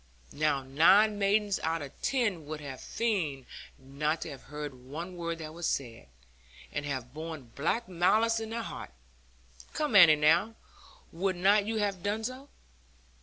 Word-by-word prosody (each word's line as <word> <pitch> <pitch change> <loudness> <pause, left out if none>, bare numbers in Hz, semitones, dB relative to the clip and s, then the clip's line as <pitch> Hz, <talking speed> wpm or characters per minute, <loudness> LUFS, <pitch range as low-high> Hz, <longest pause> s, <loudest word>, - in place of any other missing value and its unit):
Now 145 -2 +1
nine 190 +10 +4
maidens 205 0 +2
out 160 -1 -1
of 140 - -8
ten 210 - 0
would 155 0 -5
have 135 -3 -8
feigned 170 - -2 0.3
not 150 +4 -2
to 160 - -5
have 135 - -10
heard 150 -1 -6
one 150 +8 -8
word 170 -1 -3
that 155 -1 -8
was 170 0 -3
said, 120 - -3 0.6
and 145 0 -3
have 130 -3 -4
borne 155 -5 -7
black 225 +11 -1
malice 215 +6 +2
in 225 -1 -5
their 230 0 -3
hearts. - - -8 0.8
Come, 300 -8 -1
Annie, 170 -6 +9
now, 160 +9 +3 0.6
would 185 +3 -1
not 200 +3 +3
you 225 - -1
have 200 -4 -1
done 205 +3 -2
so?' 255 +4 -6
170 Hz, 160 wpm, -30 LUFS, 145-210 Hz, 0.8 s, Annie